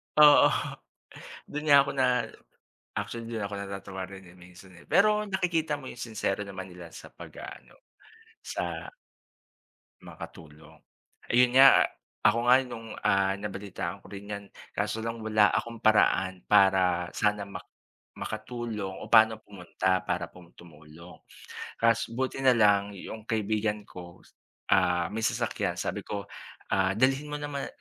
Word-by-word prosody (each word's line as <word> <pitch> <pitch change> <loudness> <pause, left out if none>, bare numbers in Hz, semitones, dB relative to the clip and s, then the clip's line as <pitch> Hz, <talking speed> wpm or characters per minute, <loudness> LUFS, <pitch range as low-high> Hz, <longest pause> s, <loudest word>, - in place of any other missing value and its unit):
Oo. 150 -1 +8 1.0
Du'n 150 +1 -5
nga 140 -1 +8
ako 140 - -4
na 130 - +4 0.9
actually 115 -1 -4
du'n 110 -3 -3
ako 100 0 -5
natatawa 100 -1 -6
rin, 95 0 -11
eh, 90 +1 -16
minsan, 90 +1 -15
eh. - - -19
Pero 210 +1 +3
nakikita 170 -5 0
mo 135 -2 -9
yung 120 - -11
sinsero 110 -4 -2
naman 95 -1 -8
nila 90 -1 -10
sa - - -12
pag-aano, - - -11 0.7
sa 85 -1 -5 1.1
Makatulong 80 -1 -12 0.5
ayun 125 +1 +5
nga, 135 0 +8 0.4
ako 115 - +5
nga 125 - +8
nung, 115 -3 -9 0.2
ah, 100 0 +3
nabalitaan 100 -1 -5
ko - - -14
rin 100 +1 -9
'yan 100 0 -5 0.3
kaso 110 - -2
lang 115 0 -4
wala 110 -1 +4
akong 115 +1 -3
paraan 95 -4 +3
para 95 -3 +4
sana 105 -1 +1
ma 100 - -7 0.6
makatulong 110 -6 -5
o - - -8
paano 110 -1 +6
pumunta 95 -1 -2
para 90 0 -1 0.3
tumulong 80 +1 -14 0.6
kas 115 0 +2
buti 130 +2 -3
na 130 - +6
lang 105 -2 +4
'yong 110 +3 -9
kaibigan 105 -1 -1
ko, 85 -1 -12 0.5
ah, 90 -2 +3
may 110 - -3
sasakyan - - -1
sabi - - -3
ko 100 -1 -5 0.5
"dalhin 130 +10 +2
mo 150 - -4
naman" 145 -1 -4
105 Hz, 135 wpm, -28 LUFS, 95-120 Hz, 1.1 s, Oo